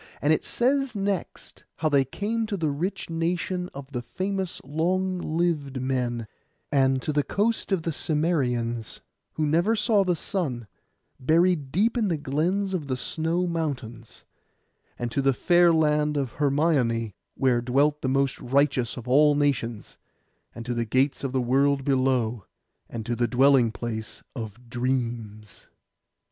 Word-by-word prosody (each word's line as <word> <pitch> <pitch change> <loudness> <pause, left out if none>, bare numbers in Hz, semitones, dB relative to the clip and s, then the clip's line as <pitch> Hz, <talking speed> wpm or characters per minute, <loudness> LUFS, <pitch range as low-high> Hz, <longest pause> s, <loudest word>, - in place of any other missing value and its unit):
And 150 +2 +3
it - - 0
says 265 0 0
next, 200 -2 -4
how 160 - -1
they 140 -2 +4
came 215 - -2
to 205 - -2
the 160 -4 0
rich 175 +5 -3
nation 180 +2 -1
of 140 0 -10
the 125 -3 -3
famous 185 +9 -3
long 180 +6 0
lived 155 -5 -1
men; 125 -3 -1 0.5
and 135 -2 +3
to 150 - -1
the 145 - +3
coast 215 +8 -1
of 185 -4 +1
the 165 - -1
Cimmerians, 125 -8 0 0.3
who 155 - -1
never 170 +9 +2
saw 210 -2 +3
the 180 -2 +1
sun, 145 - -3 0.5
buried 160 0 +2
deep 220 - +2
in 215 - +1
the 170 -4 0
glens 175 +8 -1
of 160 -6 -2
the 130 -2 -1
snow 165 +6 -1
mountains; 135 -9 -4 0.7
and 120 -1 -3
to 140 - 0
the 135 0 +3
fair 175 +5 +4
land 150 -2 +2
of 135 -4 -1
Hermione, 135 - +1 0.2
where 125 -3 +2
dwelt 140 +5 +2
the 130 - -1
most 135 0 +1
righteous 135 -2 +1
of 125 0 -8
all 145 +3 +5
nations; 130 -7 -1 0.6
and 115 - -7
to 120 - -2
the 120 0 0
gates 130 +6 +1
of 135 - -2
the 130 - 0
world 135 +2 +2
below, 130 -5 +1 0.4
and 115 -2 -6
to 120 - -1
the 120 +1 +1
dwelling 130 -1 +4
place 110 -1 -6
of 115 0 -7
dreams. 120 -4 -3
140 Hz, 155 wpm, -26 LUFS, 125-170 Hz, 0.7 s, all